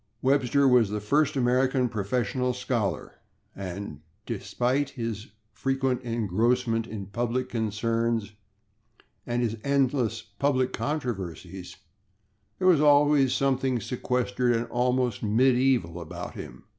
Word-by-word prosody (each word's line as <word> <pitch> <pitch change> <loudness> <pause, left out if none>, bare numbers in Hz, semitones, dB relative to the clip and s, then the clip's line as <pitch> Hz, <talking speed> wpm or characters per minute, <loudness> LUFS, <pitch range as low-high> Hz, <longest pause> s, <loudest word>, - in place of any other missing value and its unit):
Webster 140 +1 +3
was 125 -5 +5
the 105 +1 -2
first 145 +8 +1
American 130 0 +2
professional 120 +4 -1
scholar, 120 -7 -2 0.4
and 95 -5 -6 0.3
despite 130 +3 -1
his 115 -5 -5 0.2
frequent 135 -1 -1
engrossment 115 +1 0
in 105 -3 -6
public 120 +5 -2
concerns 115 0 -1 1.0
and 120 0 0
his 115 -1 -1
endless 130 -5 +1
public 130 +4 0
controversies, 95 - -4 0.8
there 185 - +1
was 170 -5 +5
always 145 -2 +5
something 135 -2 +1
sequestered 125 0 0
and 115 +1 -1
almost 125 -1 0
medieval 120 -5 +2
about 80 - -7
him. - - -9
120 Hz, 105 wpm, -27 LUFS, 110-130 Hz, 1.0 s, was